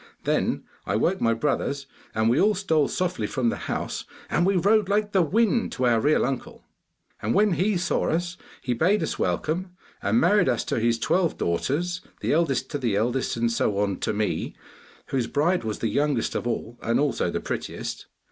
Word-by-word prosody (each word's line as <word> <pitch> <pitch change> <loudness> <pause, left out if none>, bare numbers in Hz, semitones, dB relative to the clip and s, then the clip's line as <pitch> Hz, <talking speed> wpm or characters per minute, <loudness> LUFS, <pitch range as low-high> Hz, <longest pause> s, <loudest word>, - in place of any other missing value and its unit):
Then - - 0 0.2
I - - 0
woke 190 +2 +1
my 115 0 +3
brothers, 140 +1 -1 0.3
and 110 0 +2
we 120 +5 +3
all 210 +1 +4
stole 160 -7 +2
softly 180 0 -1
from 125 -4 0
the - - -1
house, - - -3 0.3
and 175 - +2
we 195 - +2
rode 205 +3 +3
like 210 +1 +1
the 190 - +4
wind 225 - +2
to 130 - 0
our 120 -2 +4
real 150 +4 +3
uncle. 135 0 -4 0.6
'And 110 - 0
when 210 0 +4
he 190 +3 +1
saw 180 - 0
us, 175 +2 -1 0.3
he 125 - 0
bade 180 - +2
us - - -3
welcome, 180 +4 -1 0.3
and 235 - +2
married 205 - +4
us 120 - +1
to - - -1
his 115 +1 +2
twelve 175 +7 +1
daughters, 165 - -1 0.2
the - - +1
eldest 150 -5 +1
to 145 - -2
the 120 -6 0
eldest, 120 +4 0
and 115 0 +1
so 105 -3 0
on 100 -2 0
to - - -1
me, 105 0 -2 0.5
whose 130 -4 0
bride 170 +4 +1
was 110 -1 -3
the 115 - -1
youngest 145 -5 0
of - - -2
all 120 0 -4
and 115 +1 +1
also 145 -1 +1
the - - -2
prettiest. - - -5
150 Hz, 195 wpm, -25 LUFS, 120-185 Hz, 0.6 s, all